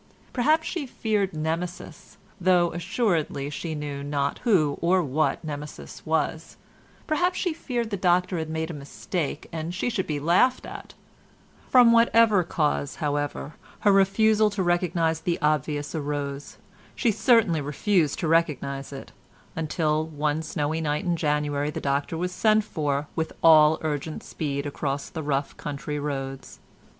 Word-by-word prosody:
Perhaps 310 +6 +2
she 320 -7 -3
feared 210 -5 -1
Nemesis, 165 +1 -5 0.2
though 175 -2 +3
assuredly 170 - -1
she 160 +2 -4
knew 145 -2 -5
not 140 0 -2
who 165 - +2
or 180 +2 +3
what 155 +2 0
Nemesis 150 -1 -7
was; 160 +1 -1 0.5
perhaps 355 +3 +1
she 355 -4 0
feared 240 -7 -3
the 200 - -1
doctor 180 -1 +2
had 160 -1 -4
made 160 +1 -3
a - - -6
mistake 150 +3 -4
and 165 +1 -4
she 220 +6 -1
should 200 -5 -2
be 150 -2 -2
laughed 180 - +3
at; - - -9 0.7
from 245 -2 +7
whatever 230 -3 +5
cause, 150 -4 -1
however, 145 0 -2 0.3
her 205 - +5
refusal 210 +2 +4
to 200 -2 -2
recognise 175 -2 +1
the 170 +1 -1
obvious 150 -1 0
arose, 145 -2 -4 0.4
she 235 - +2
certainly 215 - +3
refused 150 +2 +1
to 165 - -2
recognise 145 -4 0
it, 135 -1 -9 0.4
until 155 -1 0
one 150 0 -1
snowy 155 0 -2
night 150 +1 -1
in 175 -1 +1
January 150 -2 0
the 150 - -4
doctor 140 +3 -1
was 180 +2 -2
sent 215 +3 +3
for 145 -6 -2
with 160 -1 -2
all 155 -1 +7
urgent 155 0 -3
speed 140 -2 -3
across 140 -1 -3
the 160 - -4
rough 140 -1 -1
country 150 0 -4
roads. 135 -2 -5
160 Hz, 145 wpm, -25 LUFS, 145-185 Hz, 0.7 s, from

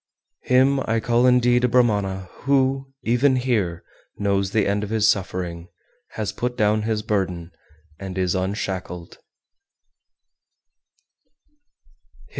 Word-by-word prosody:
402. 125 - +2 0.2
Him - - -3
I 115 0 +2
call 120 +2 +2
indeed 125 0 +3
a - - +4
Brahmana 100 -6 +1 0.2
who, 135 0 +1
even 125 +4 +3
here, 110 -10 -1 0.3
knows 100 -1 0
the 105 0 +1
end 100 +1 0
of 105 - -5
his 110 -1 +2
suffering, 90 -4 -2 0.5
has 110 -2 -3
put 125 0 -4
down 105 0 +2
his 110 0 -2
burden, 90 -5 -2 0.5
and 95 -1 -7
is 90 -2 +1
unshackled. 95 -2 -4
105 Hz, 115 wpm, -22 LUFS, 95-120 Hz, 0.5 s, a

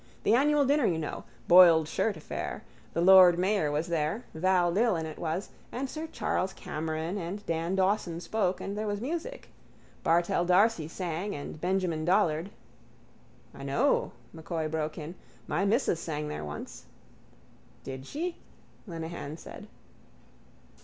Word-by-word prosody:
The 215 - +3
annual 290 +3 +4
dinner, 280 -2 +3
you 165 - +1
know. 155 -2 -5 0.2
Boiled 170 -3 +8
shirt 200 +3 -1
affair. 155 - -5 0.3
The 170 - 0
lord 180 -1 +8
mayor 185 -3 +1
was 150 +3 0
there, 170 +6 -1
Val 175 +1 +2
Dillon 200 -6 +2
it 155 -1 -8
was, 170 +4 -3 0.2
and 265 +3 -3
sir 310 +4 -6
Charles 190 +1 -1
Cameron 160 +4 -4
and 195 +4 -5
Dan 165 +2 -1
Dawson 190 -3 +1
spoke 190 0 -1
and 200 - -5
there 215 +1 -3
was 205 0 -2
music. 335 - -5 0.5
Bartell 170 +1 +2
d'Arcy 180 -1 +3
sang 180 +3 -4
and 145 +1 -7
Benjamin 180 -3 0
Dollard... 175 -1 +2 1.0
—I - - -11
know, - - +1 0.2
M'Coy 160 0 -3
broke 155 0 -3
in. 155 +1 -6 0.3
My 195 - 0
missus 205 - +1
sang 150 -2 -4
there 150 - -5
once. 75 0 -8 1.0
—Did 130 0 -7
she? 340 +4 -4 0.5
Lenehan 165 -3 -6
said. 205 - -11
175 Hz, 140 wpm, -29 LUFS, 160-205 Hz, 1.0 s, Boiled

